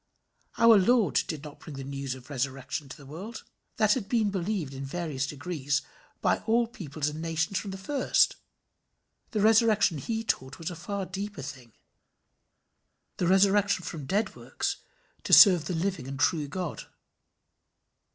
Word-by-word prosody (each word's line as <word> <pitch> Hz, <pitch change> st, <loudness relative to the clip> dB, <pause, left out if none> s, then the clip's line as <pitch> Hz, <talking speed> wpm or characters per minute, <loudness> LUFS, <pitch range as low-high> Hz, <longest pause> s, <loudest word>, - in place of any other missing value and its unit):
Our 230 Hz, -2 st, +7 dB
Lord 225 Hz, +1 st, +3 dB
did 155 Hz, -3 st, -5 dB
not 150 Hz, -1 st, -10 dB
bring 155 Hz, -, -10 dB
the 135 Hz, -, -6 dB
news 135 Hz, -1 st, -4 dB
of 130 Hz, +2 st, -13 dB
resurrection 135 Hz, +1 st, -3 dB
to -, -, -9 dB
the 140 Hz, -, -14 dB
world: 190 Hz, +11 st, -8 dB, 0.3 s
that 215 Hz, -1 st, +4 dB
had 215 Hz, -6 st, -3 dB
been 220 Hz, -4 st, +2 dB
believed, 185 Hz, -6 st, -2 dB
in 135 Hz, 0 st, -6 dB
varying 155 Hz, 0 st, -4 dB
degrees, 145 Hz, 0 st, -2 dB, 0.4 s
by -, -, +2 dB
all 235 Hz, +2 st, +3 dB
peoples 155 Hz, -10 st, -5 dB
and 155 Hz, +2 st, -7 dB
nations 165 Hz, +3 st, -1 dB
from 205 Hz, -, -6 dB
the 190 Hz, -, -5 dB
first: 265 Hz, +8 st, +2 dB, 0.9 s
the 215 Hz, -, -1 dB
resurrection 215 Hz, -6 st, +4 dB
he 225 Hz, -, -3 dB
taught 130 Hz, -10 st, -2 dB
was 165 Hz, +2 st, -5 dB
a -, -, -7 dB
far 195 Hz, +3 st, -4 dB
deeper 200 Hz, 0 st, -6 dB
thing 125 Hz, -4 st, -9 dB, 1.4 s
the 180 Hz, -, 0 dB
resurrection 195 Hz, 0 st, +3 dB
from 150 Hz, -5 st, -6 dB
dead 205 Hz, +8 st, 0 dB
works -, -, -3 dB, 0.5 s
to -, -, -1 dB
serve 180 Hz, -7 st, +9 dB
the 175 Hz, -, -2 dB
living 170 Hz, -5 st, -2 dB
and 135 Hz, 0 st, -6 dB
true 150 Hz, 0 st, +2 dB
God. 180 Hz, +1 st, -5 dB
175 Hz, 160 wpm, -28 LUFS, 140-205 Hz, 1.4 s, serve